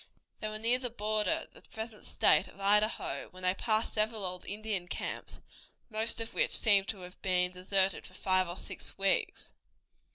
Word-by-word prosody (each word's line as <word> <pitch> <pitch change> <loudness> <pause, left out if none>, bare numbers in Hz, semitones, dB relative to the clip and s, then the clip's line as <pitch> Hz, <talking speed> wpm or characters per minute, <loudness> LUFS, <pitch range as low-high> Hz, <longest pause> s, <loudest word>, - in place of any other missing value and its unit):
They 215 - -3
were 215 0 -4
near 235 +3 +3
the 250 -1 -1
border 215 -1 0
of - - -28
the - - -15
present 220 -1 -8
state - - +4
of - - -16
Idaho 210 +2 +1
when 185 0 -13
they 185 0 +3
passed 220 +2 +1
several 215 -1 +1
old 180 0 -4
Indian 205 -3 -2
camps, - - -5 0.5
most 220 +1 0
of 225 0 -3
which - - +3
seemed 200 -3 +4
to 200 -4 -3
have 180 0 -11
been 180 -1 +1
deserted 190 +1 +2
for 185 - -14
five 185 -2 +1
or 175 - -5
six - - -7
weeks. 195 0 0
205 Hz, 185 wpm, -32 LUFS, 185-220 Hz, 0.5 s, state